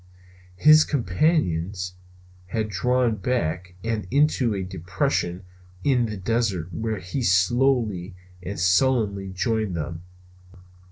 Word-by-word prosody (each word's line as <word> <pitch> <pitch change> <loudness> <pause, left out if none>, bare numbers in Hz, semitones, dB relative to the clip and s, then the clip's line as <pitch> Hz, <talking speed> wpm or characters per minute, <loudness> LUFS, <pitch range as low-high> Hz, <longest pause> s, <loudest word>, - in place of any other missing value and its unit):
His 155 +9 +7
companions 95 - 0 0.5
had 110 +2 -2
drawn 125 +3 +1
back 90 -8 -2
and 115 -4 -2
into 135 -5 +2
a 95 - -2
depression 90 0 -2 0.4
in 125 -4 +2
the 105 -1 -5
desert 95 -4 -1
where 110 +2 -2
he 90 +8 -4
slowly 105 -1 +2 0.3
and 95 +3 -6
sullenly 100 +1 +2
joined 110 0 -1
them. 85 +1 -4
100 Hz, 105 wpm, -24 LUFS, 90-120 Hz, 0.5 s, His